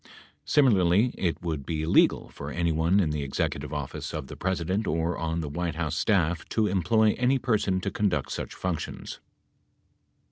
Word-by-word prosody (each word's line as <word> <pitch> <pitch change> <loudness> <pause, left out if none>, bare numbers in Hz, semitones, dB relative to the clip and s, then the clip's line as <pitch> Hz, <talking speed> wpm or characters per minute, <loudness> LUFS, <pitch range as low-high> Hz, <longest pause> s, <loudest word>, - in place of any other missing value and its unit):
Similarly, 110 -4 +4
it 85 -1 -2
would 80 -5 -2
be 80 +1 -3
illegal 80 - +3
for - - -8
anyone 85 +2 +1
in 80 -6 +1
the 75 -1 -2
Executive 70 +1 -2
Office 75 -3 -5
of 75 -3 -4
the - - -9
President 95 +2 -1
or 80 +2 0
on 80 +1 -2
the 75 - -4
White 85 +2 -3
House 80 -1 -2
staff 90 -2 +1
to 110 - +1
employ 105 +3 +3
any 125 +2 +3
person 105 -7 +1
to 100 - -2
conduct 90 -10 0
such - - -5
functions. 90 -4 -4
85 Hz, 165 wpm, -27 LUFS, 80-100 Hz, -, Similarly